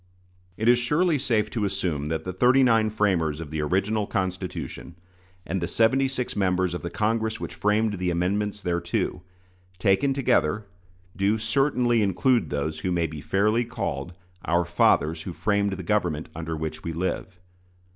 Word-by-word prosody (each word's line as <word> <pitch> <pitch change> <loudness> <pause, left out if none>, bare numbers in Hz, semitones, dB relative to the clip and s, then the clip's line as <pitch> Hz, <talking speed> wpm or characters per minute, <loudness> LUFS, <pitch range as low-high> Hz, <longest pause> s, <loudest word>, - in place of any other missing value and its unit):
It 110 - -1
is 120 0 +6
surely 150 +6 +2
safe 115 -5 0
to 110 - -2
assume 90 -7 -1
that 80 0 -2
the 90 - -4
thirty 125 +7 +4
nine 115 -3 +4
framers 90 -8 0
of 80 -2 -7
the 80 -1 -2
original 100 +6 0
Constitution, 95 -3 -4 0.5
and 95 +1 -2
the 85 - -1
seventy 130 +7 +3
six 130 -2 -3
members 95 -2 +1
of 90 - -4
the 85 - -4
Congress 110 +2 -1
which - - -6
framed 105 -1 +1
the 90 -1 0
amendments 100 +4 -1
thereto, 85 -1 -1 0.6
taken 100 +9 +2
together, 110 - +1 0.5
do 100 +3 +2
certainly 120 0 +2
include 115 +5 +2
those 75 +2 -2
who 90 +3 -2
may 85 -1 +1
be 75 -2 -6
fairly 105 +7 +2
called 110 -5 -4 0.3
"our 85 +2 +1
fathers 80 -2 +2
who 90 - -6
framed 100 +1 0
the 95 0 -5
government 85 -5 -1
under 80 0 -4
which 80 0 -5
we 85 - -3
live." 90 +1 -3
95 Hz, 165 wpm, -25 LUFS, 85-110 Hz, 0.6 s, is